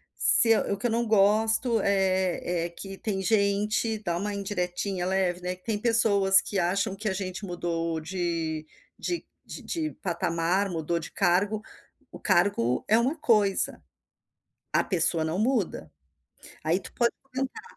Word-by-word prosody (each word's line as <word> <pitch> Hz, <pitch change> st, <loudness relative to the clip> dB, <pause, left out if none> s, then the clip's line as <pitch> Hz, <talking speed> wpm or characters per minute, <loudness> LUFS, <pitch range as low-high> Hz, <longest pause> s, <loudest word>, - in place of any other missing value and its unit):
se 225 Hz, -1 st, +5 dB, 0.2 s
o 200 Hz, -, 0 dB
que 210 Hz, -, -7 dB
eu -, -, -2 dB
não 235 Hz, +1 st, +1 dB
gosto 220 Hz, +3 st, +3 dB
é 185 Hz, -3 st, +1 dB
é -, -, -11 dB
que 195 Hz, +3 st, -9 dB
tem 195 Hz, -2 st, -3 dB
gente" 210 Hz, +2 st, +1 dB
dá 170 Hz, -2 st, -1 dB
uma 205 Hz, +3 st, -3 dB
indiretinha 185 Hz, -1 st, -2 dB
leve, 185 Hz, -1 st, 0 dB
né: 180 Hz, 0 st, -3 dB
"Tem 205 Hz, +3 st, -3 dB
pessoas 205 Hz, -4 st, +4 dB
que 200 Hz, -, -2 dB
acham 195 Hz, +3 st, 0 dB
que 210 Hz, +1 st, -3 dB
a -, -, -1 dB
gente 190 Hz, +1 st, -5 dB
mudou 170 Hz, -2 st, -2 dB
de 165 Hz, -2 st, -3 dB, 0.3 s
de 350 Hz, -1 st, -3 dB, 0.2 s
de -, -, -9 dB
de 315 Hz, -2 st, -3 dB
patamar, 175 Hz, +1 st, 0 dB
mudou 170 Hz, -1 st, -2 dB
de -, -, -8 dB
cargo, 200 Hz, +3 st, +1 dB, 0.5 s
o -, -, -10 dB
cargo 150 Hz, -10 st, +2 dB
é 220 Hz, -, +5 dB
uma 265 Hz, +7 st, +1 dB
coisa, 210 Hz, -8 st, +2 dB, 0.9 s
a -, -, +3 dB
pessoa 165 Hz, -3 st, +1 dB
não 160 Hz, +4 st, -2 dB
muda". 215 Hz, -, -1 dB, 0.7 s
Aí 160 Hz, +3 st, +1 dB
tu -, -, -11 dB
pode 235 Hz, -1 st, +2 dB
comentar: 270 Hz, +9 st, -5 dB
195 Hz, 150 wpm, -27 LUFS, 175-215 Hz, 0.9 s, se